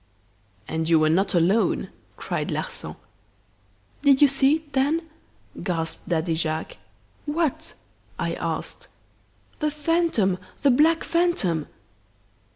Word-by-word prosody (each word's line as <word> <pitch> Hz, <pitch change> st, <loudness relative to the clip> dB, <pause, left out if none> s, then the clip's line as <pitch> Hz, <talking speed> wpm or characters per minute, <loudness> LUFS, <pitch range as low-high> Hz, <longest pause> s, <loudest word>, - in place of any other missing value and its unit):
"'And 160 Hz, 0 st, -2 dB
you 165 Hz, -, +6 dB
were 155 Hz, 0 st, +3 dB
not 190 Hz, +3 st, +2 dB
alone!' 180 Hz, +7 st, +2 dB, 0.3 s
cried -, -, -3 dB
Larsan. -, -, -4 dB, 1.1 s
"'Did 280 Hz, -2 st, +5 dB
you 290 Hz, -, +7 dB
see 275 Hz, +1 st, +4 dB
it 315 Hz, -2 st, -9 dB
then?' 300 Hz, +5 st, +1 dB, 0.5 s
gasped 165 Hz, -3 st, -3 dB
Daddy 165 Hz, 0 st, 0 dB
Jacques. 160 Hz, 0 st, -2 dB, 0.5 s
"'What?' 315 Hz, +1 st, -1 dB, 0.4 s
I -, -, -2 dB
asked. -, -, -4 dB, 0.7 s
"'The 305 Hz, -1 st, +1 dB
phantom 300 Hz, -, +1 dB, 0.2 s
the 280 Hz, -, +6 dB
black 320 Hz, +6 st, +4 dB
phantom! 275 Hz, -, +1 dB
270 Hz, 110 wpm, -24 LUFS, -, 1.1 s, you